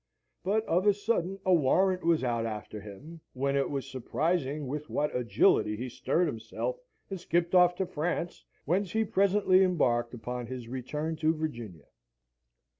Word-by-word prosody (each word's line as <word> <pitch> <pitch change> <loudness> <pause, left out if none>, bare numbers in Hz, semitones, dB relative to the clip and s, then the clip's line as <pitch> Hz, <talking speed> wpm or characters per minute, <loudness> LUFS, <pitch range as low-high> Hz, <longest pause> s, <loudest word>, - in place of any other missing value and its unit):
But 215 +4 +1
of 180 +2 +1
a 205 - +5
sudden 195 -3 -1
a 185 - +4
warrant 180 +5 +3
was 165 -4 +2
out 115 -2 0
after 105 -1 -6
him, 145 +12 -11
when 140 +1 -1
it 140 -1 +1
was 140 -2 -3
surprising 145 +3 -1
with 150 +3 -5
what 150 0 -1
agility 115 -3 +3
he 125 +3 -4
stirred 170 +8 0
himself, 130 - -4 0.3
and 190 - -4
skipped 175 0 0
off 180 -1 +6
to 190 - -1
France, 175 0 -3 0.2
whence 180 +4 0
he 220 0 +2
presently 195 -1 +3
embarked 125 -10 +1
upon 120 +1 -5
his 125 -1 -7
return 150 +6 -4
to 160 +1 +2
Virginia. 120 - -5
155 Hz, 160 wpm, -29 LUFS, 125-180 Hz, 0.3 s, off